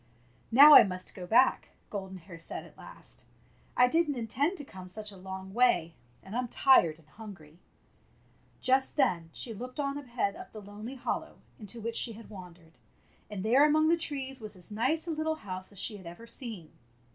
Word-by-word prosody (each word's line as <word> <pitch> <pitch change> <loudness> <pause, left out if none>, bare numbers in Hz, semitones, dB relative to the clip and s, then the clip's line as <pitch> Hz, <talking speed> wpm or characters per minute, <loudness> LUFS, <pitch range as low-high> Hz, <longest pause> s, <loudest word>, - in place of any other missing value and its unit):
''Now 285 +6 +10
I - - +12
must 185 -4 -2
go 180 -2 -8
back," 250 +6 +3 0.2
Golden 190 -2 -5
Hair 170 -1 -12
said 165 - -5
at - - -17
last. - - -11 0.3
" - - -28
I 250 - +6
did 330 +4 +2
n't 285 - -2
intend 275 - -1
to 290 - -7
come 185 -6 -11
such 210 +2 -6
a - - -12
long 190 0 -8
way, 180 -9 +3 0.3
and 195 +3 -8
I'm 250 0 -1
tired 200 - +4
and 160 -2 -23
hungry." 175 -5 -12 1.0
Just 265 +1 +2
then 175 - +1
she 230 +7 -4
looked 250 +6 -8
on 280 0 -1
ahead 240 -7 -2
up - - -11
the 215 - -8
lonely 210 +5 -9
hollow 255 - -4 0.2
into 215 +2 -7
which 230 +1 -4
she 230 - +1
had 225 +1 -13
wandered, 175 -6 -13 0.5
and 200 -3 -5
there 255 +6 +5
among 310 +1 +4
the 335 - +5
trees 270 -5 -5
was 215 -1 -8
as 180 +2 -12
nice 260 +10 0
a 340 - -3
little 315 0 -1
house 185 -8 -8
as 200 - -11
she 210 +1 0
had 185 -3 -12
ever 175 +7 -10
seen. 230 - -7
220 Hz, 200 wpm, -30 LUFS, 185-265 Hz, 1.0 s, I